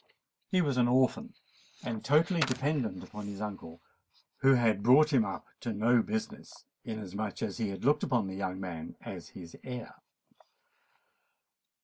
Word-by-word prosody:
He 185 Hz, -2 st, +3 dB
was 140 Hz, -4 st, 0 dB
an 120 Hz, -1 st, +4 dB
orphan, 130 Hz, +1 st, +2 dB, 0.5 s
and 115 Hz, -3 st, -4 dB
totally 160 Hz, +5 st, +3 dB
dependent 130 Hz, -, 0 dB
upon 105 Hz, -1 st, -8 dB
his 100 Hz, -1 st, -6 dB
uncle, 95 Hz, -6 st, -7 dB, 0.5 s
who 135 Hz, 0 st, +5 dB
had 115 Hz, -4 st, +2 dB
brought 145 Hz, +7 st, +6 dB
him 125 Hz, -5 st, +5 dB
up 95 Hz, -5 st, -5 dB
to 115 Hz, -, -3 dB
no 115 Hz, +3 st, +4 dB
business, 110 Hz, 0 st, -5 dB, 0.2 s
inasmuch 105 Hz, -2 st, -4 dB
as -, -, -3 dB
he 110 Hz, -3 st, 0 dB
had 95 Hz, +4 st, -6 dB
looked 150 Hz, +2 st, +4 dB
upon 120 Hz, -7 st, +1 dB
the 95 Hz, -, -5 dB
young 95 Hz, -1 st, -3 dB
man 85 Hz, -4 st, -6 dB
as -, -, -8 dB
his 85 Hz, -2 st, -10 dB
heir. 125 Hz, -3 st, -6 dB
110 Hz, 150 wpm, -31 LUFS, 100-130 Hz, 0.5 s, brought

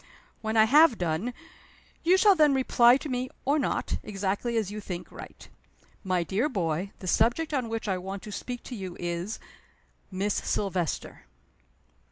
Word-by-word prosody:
When 220 Hz, 0 st, -1 dB
I 220 Hz, -, +8 dB
have 285 Hz, +2 st, +6 dB
done, 175 Hz, +7 st, -1 dB, 0.7 s
you 355 Hz, +3 st, +5 dB
shall 405 Hz, +1 st, +6 dB
then 300 Hz, -5 st, +4 dB
reply 250 Hz, -1 st, +5 dB
to 300 Hz, -, -7 dB
me 255 Hz, -1 st, -2 dB, 0.2 s
or 285 Hz, +3 st, +2 dB
not, 270 Hz, -, -1 dB
exactly 205 Hz, +3 st, -2 dB
as 210 Hz, -3 st, -1 dB
you 210 Hz, 0 st, -6 dB
think 180 Hz, -3 st, -7 dB
right. -, -, -11 dB, 0.6 s
My 185 Hz, -3 st, 0 dB
dear 205 Hz, -, 0 dB
boy, 180 Hz, -, -2 dB
the 185 Hz, -, -9 dB
subject 245 Hz, -, +2 dB
on 255 Hz, -5 st, -1 dB
which 225 Hz, -1 st, -4 dB
I 190 Hz, -2 st, 0 dB
want 190 Hz, +2 st, -6 dB
to 210 Hz, -, -8 dB
speak 245 Hz, +4 st, -6 dB
to 250 Hz, -, -7 dB
you 190 Hz, -4 st, -7 dB
is 175 Hz, +4 st, -3 dB, 0.7 s
Miss 195 Hz, +2 st, -1 dB
Silvester." 185 Hz, -5 st, -2 dB
215 Hz, 165 wpm, -27 LUFS, 190-255 Hz, 0.7 s, I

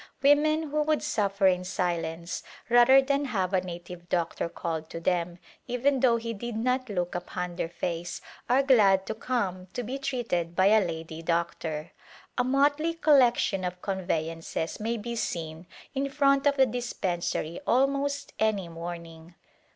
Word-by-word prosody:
Women 305 Hz, +2 st, +4 dB
who 305 Hz, 0 st, +1 dB
would 305 Hz, 0 st, +1 dB
suffer 200 Hz, -1 st, 0 dB
in 180 Hz, -1 st, +4 dB
silence 170 Hz, -2 st, -2 dB, 0.3 s
rather 245 Hz, +3 st, +7 dB
than 280 Hz, +1 st, 0 dB
have 195 Hz, -7 st, -1 dB
a 185 Hz, -, +3 dB
native 175 Hz, -1 st, -9 dB
doctor 170 Hz, -1 st, -1 dB
called 160 Hz, -2 st, -4 dB
to 165 Hz, -, -6 dB
them, 175 Hz, 0 st, -1 dB, 0.3 s
even 260 Hz, +3 st, +1 dB
though 240 Hz, -2 st, +4 dB
he 230 Hz, 0 st, -4 dB
did 235 Hz, +2 st, -5 dB
not 250 Hz, +2 st, 0 dB
look 180 Hz, -3 st, -2 dB
upon 175 Hz, 0 st, -4 dB
their 165 Hz, -, -2 dB
face, 175 Hz, 0 st, -4 dB, 0.3 s
are 260 Hz, +3 st, +4 dB
glad 200 Hz, -8 st, +5 dB
to -, -, -3 dB
come 205 Hz, -6 st, -2 dB
to 245 Hz, -, -3 dB
be 260 Hz, +5 st, -4 dB
treated 230 Hz, -11 st, -2 dB
by 190 Hz, +2 st, +5 dB
a 215 Hz, -1 st, +5 dB
lady 160 Hz, -2 st, -5 dB
doctor. 165 Hz, -1 st, -2 dB, 0.4 s
A 250 Hz, -, +2 dB
motley 285 Hz, +5 st, +2 dB
col 310 Hz, -3 st, +5 dB
lection 235 Hz, -6 st, +3 dB
of 180 Hz, 0 st, -4 dB
conveyances 165 Hz, -4 st, -3 dB
may 230 Hz, +2 st, -1 dB
be 235 Hz, +2 st, -5 dB
seen 165 Hz, -5 st, -4 dB, 0.3 s
in 275 Hz, 0 st, -1 dB
front 275 Hz, 0 st, +3 dB
of 285 Hz, 0 st, +2 dB
the 265 Hz, -, +6 dB
dispensary 185 Hz, -9 st, -2 dB
almost 275 Hz, +2 st, +1 dB
any 215 Hz, -4 st, +1 dB
morning. 165 Hz, 0 st, -8 dB
195 Hz, 160 wpm, -28 LUFS, 170-260 Hz, 0.4 s, rather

